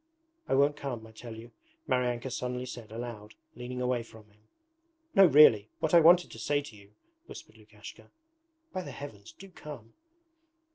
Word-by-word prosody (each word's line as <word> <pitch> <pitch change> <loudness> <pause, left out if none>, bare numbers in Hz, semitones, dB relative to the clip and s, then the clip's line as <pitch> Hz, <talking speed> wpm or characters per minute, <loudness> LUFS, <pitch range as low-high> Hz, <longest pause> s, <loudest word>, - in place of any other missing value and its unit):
'I - - +2
won't 145 +2 +3
come, 125 -6 -5
I 110 - -14
tell 115 +1 -10
you,' 115 +2 -12 0.4
Maryanka 125 0 -1
suddenly 125 0 -4
said 120 -3 -9
aloud, 110 -2 -8 0.2
leaning 125 +1 -6
away 125 -1 0
from 110 -2 -15
him. 105 - -28 0.7
'No 195 -1 +7
really... 130 -9 +6
what 160 - -1
I 170 - +9
wanted 175 +2 +5
to 115 - -10
say 145 +7 0
to 145 -6 -10
you, 100 0 -18
...' 335 0 -46
whispered - - -12
Lukashka. - - -14 0.6
'By 185 - -3
the - - -8
Heavens! 110 -7 -10
Do 195 - -14
come!' 145 -10 -11
125 Hz, 175 wpm, -29 LUFS, 110-145 Hz, 0.7 s, I